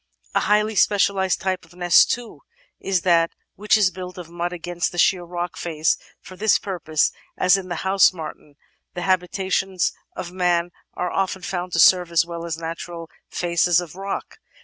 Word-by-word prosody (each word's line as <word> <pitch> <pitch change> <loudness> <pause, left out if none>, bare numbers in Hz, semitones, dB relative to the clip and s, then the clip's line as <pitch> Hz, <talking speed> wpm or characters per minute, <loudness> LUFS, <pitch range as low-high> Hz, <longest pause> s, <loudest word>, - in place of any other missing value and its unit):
A - - +3
highly 210 +1 +2
specialised 195 -2 +2
type 185 -1 -1
of 165 +1 -19
nest, 175 -1 +5
too, 240 -1 -4 0.4
is 190 -2 0
that 170 -2 +3 0.2
which 210 +2 +2
is 200 -3 +3
built 180 0 -8
of 170 -2 -9
mud 175 0 -3
against 175 0 -3
the 175 - -9
sheer 180 +1 +3
rock 175 0 -5
face, 160 -2 0
and - - -26
for 185 - -10
this 215 +3 +3
purpose 165 -6 0
— - - -30
^as 185 +1 +5
in 190 -2 -4
the 175 +1 -4
House 195 +1 +5
Martin 155 -4 -9 0.2
— - - -49
^the 175 - -4
habitations 190 0 0 0.2
of 175 - -6
man 175 -1 +1 0.2
are 180 0 -2
often 190 -1 -1
found 180 -2 -4
to 165 - +1
serve 180 +1 +6
as 165 0 +3
well 170 0 -6
as 160 -1 -3
natural 165 0 -7 0.2
faces 175 0 +2
of 175 -4 -7
rock. 195 - -5
180 Hz, 190 wpm, -22 LUFS, 170-190 Hz, 0.4 s, serve